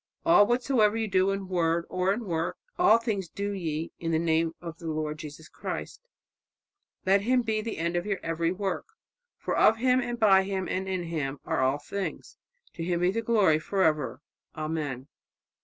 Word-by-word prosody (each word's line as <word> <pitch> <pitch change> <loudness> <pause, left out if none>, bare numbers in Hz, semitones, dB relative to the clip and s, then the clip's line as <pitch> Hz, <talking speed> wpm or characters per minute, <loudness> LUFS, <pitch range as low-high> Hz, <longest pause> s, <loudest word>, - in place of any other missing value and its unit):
'All 210 -11 +6
whatsoever 240 -3 +2
you 225 -1 -1
do 190 -1 +2
in 195 -1 -2
word 170 -2 +1
or 185 +1 0
in 225 +3 -2
work, 165 -2 -2 0.2
all 355 -10 +6
things 210 -7 -3
do 200 +3 -3
ye 165 -4 -3
in 165 - -3
the 160 - +2
name 160 0 +1
of 165 -1 -8
the 165 - -7
Lord 155 -1 -3
Jesus 155 +1 -9
Christ,' - - -6 1.0
let 195 +1 +4
Him 250 +3 +2
be 220 -1 0
the 225 +1 -5
end 170 +2 -1
of 175 +3 -1
your 200 -2 0
every 165 0 0
work; 195 +1 -3 0.5
'for - - -2
of 220 - +5
Him, 255 +2 +3
and 240 -1 -4
by 195 -3 +6
Him, 190 -1 -3
and 190 +1 -2
in 185 -2 -1
Him, 150 -5 -3
are - - 0
all 130 +2 +2
things; 190 +2 -5 0.4
to 165 - -5
Him 175 0 -1
be 180 +1 +3
glory 215 -7 +3
for 190 +4 0
ever. 150 -4 0 0.3
Amen.'" 150 -4 -3
185 Hz, 190 wpm, -28 LUFS, 160-205 Hz, 1.0 s, All